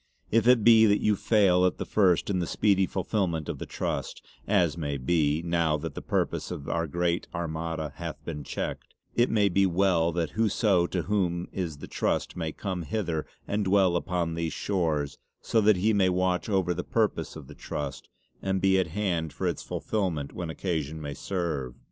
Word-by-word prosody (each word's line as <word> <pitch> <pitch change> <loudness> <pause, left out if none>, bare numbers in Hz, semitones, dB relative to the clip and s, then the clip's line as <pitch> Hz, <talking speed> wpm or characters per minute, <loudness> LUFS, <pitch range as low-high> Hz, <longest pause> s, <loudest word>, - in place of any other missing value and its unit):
If 115 +2 +3
it 125 -3 +6
be 110 -1 +7
that 105 0 +3
you 105 - +2
fail 95 -4 +3
at 90 - +2
the - - -4
first 95 -2 +2
in 95 - 0
the 85 - -1
speedy 95 -3 +2
fullfillment 90 -5 -1
of - - -4
the - - -6
Trust - - -4 0.2
as 90 -7 +3
may 75 -4 -3
be, 75 +3 +1
now 85 -3 +1
that 80 0 -5
the - - -6
purpose - - -1
of 70 - -6
our 85 -1 -1
great 85 +2 -1
Armada 80 -2 -3
hath - - -5
been 75 -3 -5
checked - - -5 0.2
it 120 +2 +3
may 105 -2 +3
be 95 +1 +3
well 85 -2 +2
that 85 -3 -1
whoso 105 -4 +2
to 90 -2 -2
whom 90 -2 0
is 85 -6 -3
the - - -9
Trust - - -1
may 80 -3 -3
come 95 -1 -4
hither 85 -4 -2 0.2
and 105 0 0
dwell 95 -2 +4
upon 85 -1 -1
these 80 -2 -2
shores 80 -8 -1 0.2
so 115 - +1
that 105 0 +5
he 105 +5 +2
may 95 -2 +3
watch 90 +2 0
over 95 -3 +1
the 90 +1 -4
purpose 105 -8 0
of 80 -3 -9
the - - -11
Trust 70 -2 -6 0.3
and 95 0 0
be 95 0 +3
at 95 - +1
hand 85 -3 -1
for - - -4
its - - -1
fullfillment 85 -10 -2
when 85 -2 -5
occasion 80 -3 -3
may 70 -2 -5
serve. 80 -7 -3
90 Hz, 195 wpm, -27 LUFS, 80-100 Hz, 0.3 s, be